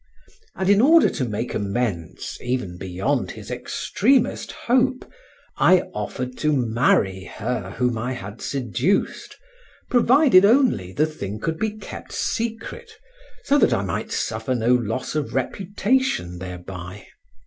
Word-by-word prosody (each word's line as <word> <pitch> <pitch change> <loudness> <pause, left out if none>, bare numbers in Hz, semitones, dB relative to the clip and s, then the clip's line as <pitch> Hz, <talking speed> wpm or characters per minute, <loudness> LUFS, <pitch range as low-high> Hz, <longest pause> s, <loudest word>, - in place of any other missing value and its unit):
And 190 - -2
in 200 +1 +5
order 320 +6 +6
to 130 - -2
make 105 +3 -3
amends 100 -5 -3
even 120 -8 -3
beyond 95 0 -1
his - - -9
extremest 255 +3 0
hope, 255 +1 +1 0.5
I 185 -1 +5
offered 125 +4 -5
to 150 0 +2
marry 110 -6 +1
her 105 -2 -4
whom 125 -3 0
I 125 +3 -2
had 105 -2 -8
seduced, 140 - -1 0.5
provided 245 -4 +6
only 220 - +3
the 150 +9 +2
thing 105 -10 -6
could 160 +6 -3
be 215 -1 -2
kept 215 - -9
secret, 235 - -3 0.5
so 290 - +3
that - - +4
I - - -1
might - - -3
suffer 130 - -2
no 120 +1 +2
loss 120 0 -1
of 150 -3 -3
reputation 195 - 0
thereby. 90 +1 -8
125 Hz, 130 wpm, -23 LUFS, -, 0.5 s, order